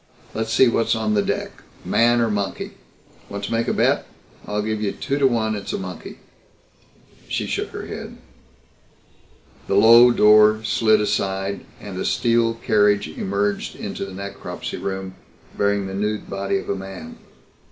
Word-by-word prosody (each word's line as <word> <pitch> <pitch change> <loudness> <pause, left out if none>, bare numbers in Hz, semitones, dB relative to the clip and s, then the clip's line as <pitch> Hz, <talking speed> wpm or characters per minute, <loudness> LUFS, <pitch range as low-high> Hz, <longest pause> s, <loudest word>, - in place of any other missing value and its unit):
"Let's 110 0 -3
see 130 - +5
what's 115 0 +1
on 110 -1 0
deck 100 -1 -2 0.2
man 120 +1 +3
or 115 -2 +1
monkey. 100 -2 -3 0.6
Want 100 0 -6
to 100 - -4
make 115 0 0
a - - +1
bet? - - +1 0.4
I'll 105 0 -1
give 110 0 -2
you 100 -2 -1
two 140 +1 -2
to 135 - +5
one 110 -3 0
it's 100 - -5
a - - -1
monkey." 90 -2 -8 1.1
She - - -2
shook - - -3
her - - -7
head. - - -8 1.5
The 95 - 0
low 115 +4 +8
door 110 -1 +5
slid 110 0 +3
aside 95 -1 -1 0.2
and 95 -3 -7
a - - -2
steel 115 -1 +2
carriage 105 -5 +2
emerged 100 +5 -2
into - - -5
the 95 - -7
necropsy 100 +1 -6
room 95 -1 -4 0.4
bearing 100 -1 +1
the 95 - -6
nude 105 +2 -2
body 100 - -1
of - - -6
a - - 0
man. 95 -4 -8
105 Hz, 160 wpm, -22 LUFS, 100-110 Hz, 1.5 s, low